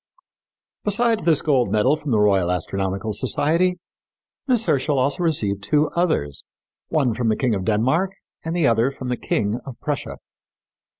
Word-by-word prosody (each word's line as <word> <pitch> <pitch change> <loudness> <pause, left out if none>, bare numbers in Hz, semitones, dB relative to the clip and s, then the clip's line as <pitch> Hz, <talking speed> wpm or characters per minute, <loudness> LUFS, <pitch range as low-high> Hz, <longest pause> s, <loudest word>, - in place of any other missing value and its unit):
" - - -71
Besides 225 +2 +1
this 160 -4 +3
gold 135 -6 +2
medal 125 +7 +3
from 150 -1 -7
the 110 -4 +2
Royal 100 -4 +3
Astronomical 95 +4 -2
Society, 165 - +1 0.7
Miss 245 -4 +2
Herschel 140 +1 +1
also 140 +7 0
received 105 - 0
two 150 +8 +1
others, 155 - -1 0.5
one 140 -7 +1
from 120 0 -1
the 110 - +2
King 125 -4 +1
of 95 -2 -2
Denmark 130 - +1 0.3
and 160 +1 -3
the 170 -4 +2
other 115 +1 +3
from 130 -2 -7
the 125 - 0
King 105 +2 -1
of 135 - -8
Prussia. 145 -2 -4
130 Hz, 165 wpm, -22 LUFS, 105-160 Hz, 0.7 s, this